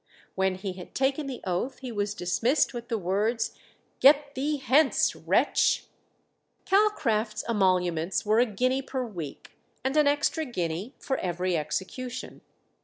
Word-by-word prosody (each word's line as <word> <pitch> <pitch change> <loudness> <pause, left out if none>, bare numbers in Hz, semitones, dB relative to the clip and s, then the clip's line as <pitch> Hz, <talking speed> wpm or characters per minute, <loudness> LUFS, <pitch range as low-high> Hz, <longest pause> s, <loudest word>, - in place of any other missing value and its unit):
When 190 0 +1
he 190 0 -5
had 180 -1 -11
taken 275 +2 0
the 260 -2 -6
oath 190 +9 -2
he 255 -2 -7
was 205 -1 -2
dismissed 230 - +1
with 240 -1 -6
the 230 - -1
words, 215 +5 0 0.5
"Get 285 +1 +5
thee 290 +3 -1
hence, 275 +2 +3
wretch!" - - +2 0.8
Calcraft's 235 - +1
emoluments 185 -4 +1
were 215 +2 +3
a 245 - +4
guinea 255 +5 0
per 265 -1 -3
week, 170 - -8 0.2
and 265 +2 -1
an 300 -1 +5
extra 290 +3 +1
guinea 185 - -3
for 265 - -2
every 180 0 -1
execution. 190 - -4
230 Hz, 140 wpm, -27 LUFS, 185-270 Hz, 0.8 s, Get